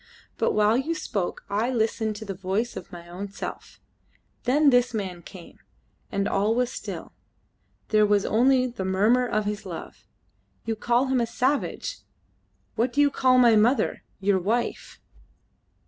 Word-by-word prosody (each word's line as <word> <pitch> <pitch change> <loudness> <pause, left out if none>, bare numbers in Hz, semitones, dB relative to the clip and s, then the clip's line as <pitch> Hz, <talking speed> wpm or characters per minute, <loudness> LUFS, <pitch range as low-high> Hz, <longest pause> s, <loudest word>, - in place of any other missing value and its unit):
But - - +2
while 210 +1 +3
you 310 +6 -1
spoke 200 - -3
I 215 +4 0
listened 220 -2 0
to 215 +1 -8
the 200 - -4
voice 195 +5 -2
of - - -8
my 170 -1 -10
own 185 +4 -6
self; 200 - -8 0.7
then 280 +3 +4
this 245 -1 +3
man 185 -4 -4
came, 175 -1 -13 0.5
and 200 0 0
all 205 +3 +1
was 250 0 0
still; - - -7 0.8
there 215 -1 +4
was 205 -1 +2
only 255 +3 +3
the 240 -6 -5
murmur 210 +7 +2
of 215 -3 -1
his 210 0 -3
love. - - -9 0.6
You 225 - -1
call 240 +4 +1
him 260 -2 +1
a 235 - 0
savage! 275 - -1 0.7
What 240 +2 0
do 290 - -1
you 290 -1 +5
call 255 -1 +3
my 240 -3 +6
mother, 225 +2 +2 0.2
your 195 -1 +2
wife?" 225 +6 -2
220 Hz, 160 wpm, -25 LUFS, 200-250 Hz, 0.8 s, my